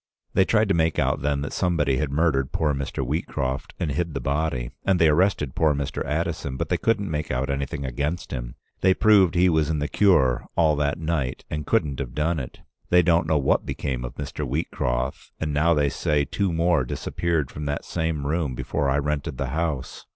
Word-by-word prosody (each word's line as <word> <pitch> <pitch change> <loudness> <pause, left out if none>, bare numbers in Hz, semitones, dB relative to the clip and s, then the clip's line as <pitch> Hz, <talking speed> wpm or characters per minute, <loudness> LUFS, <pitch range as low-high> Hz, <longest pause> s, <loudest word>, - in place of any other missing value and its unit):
They 95 - +4
tried 110 +1 +3
to - - +4
make 80 -1 +1
out - - +1
then 70 0 0
that 75 - -4
somebody 80 -7 +1
had 75 +1 -1
murdered 70 -3 +1
poor 75 -2 +1
Mr. 70 -1 -3
Wheatcroft 65 -2 -2
and 75 - -1
hid 80 +2 -2
the - - -1
body, 70 -2 -1
and 95 -1 +3
they 80 - +5
arrested 75 -4 +2
poor 75 -2 +2
Mr. 70 -1 -3
Addison, 65 -2 -2
but - - -3
they - - +2
couldn't 105 -5 0
make 75 0 -2
out 65 +2 -1
anything 70 +1 -3
against 70 +7 -3
him. - - -5 0.2
They 95 0 +4
proved 100 -4 +5
he 90 +1 +5
was 80 -3 +2
in 80 - 0
the 75 0 -1
Cure 75 -11 +3
all 80 -2 +4
that 70 -1 0
night 80 -6 -2
and 75 -1 -4
couldn't 70 -3 +1
have 65 -2 -5
done 80 +2 0
it. 65 - -8 0.3
They 90 0 +5
don't 85 -1 +3
know 80 - +3
what 70 -1 +2
became 65 -4 -3
of - - -6
Mr. 75 +1 -5
Wheatcroft, 65 -3 -2
and 75 -2 -2
now 80 +3 +3
they 75 -1 +2
say 75 +2 0
two 90 +7 -1
more 85 -3 +2
disappeared 80 +3 -2
from 75 - -6
that 75 0 -3
same 80 -4 -2
room 75 -3 -1
before 70 +3 -1
I 70 - +2
rented 75 -1 -2
the 65 0 -2
house. 75 -3 -3
75 Hz, 210 wpm, -24 LUFS, 70-85 Hz, 0.3 s, they